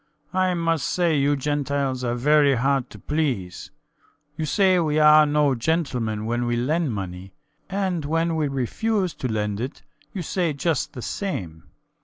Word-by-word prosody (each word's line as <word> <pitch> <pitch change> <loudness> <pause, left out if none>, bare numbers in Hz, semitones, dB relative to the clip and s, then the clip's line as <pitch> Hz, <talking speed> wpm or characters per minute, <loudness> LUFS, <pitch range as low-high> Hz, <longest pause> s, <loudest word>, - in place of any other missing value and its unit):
I 185 -1 +2
must 165 -4 0
say 175 -3 +1
you 145 +1 +2
Gentiles 140 -2 -1
are 120 -1 -1
very 145 +2 +4
hard 135 +1 0
to - - -12
please. 125 - -2 0.7
You 155 - -2
say 190 +1 +3
we 155 -3 0
are 150 0 +7
no 145 -1 +2
gentlemen 120 -6 -1
when 120 +1 -1
we 120 - 0
lend 150 +5 0
money; 95 -2 -6 0.3
and 190 -4 -1
when 165 +3 0
we 155 -2 0
refuse 180 - -1
to 130 - -4
lend 105 -1 -2
it 130 +5 -5 0.3
you 185 - -5
say 170 -1 -1
just 155 +3 -1
the 125 - -7
same. 90 - -4
145 Hz, 160 wpm, -23 LUFS, 120-165 Hz, 0.7 s, are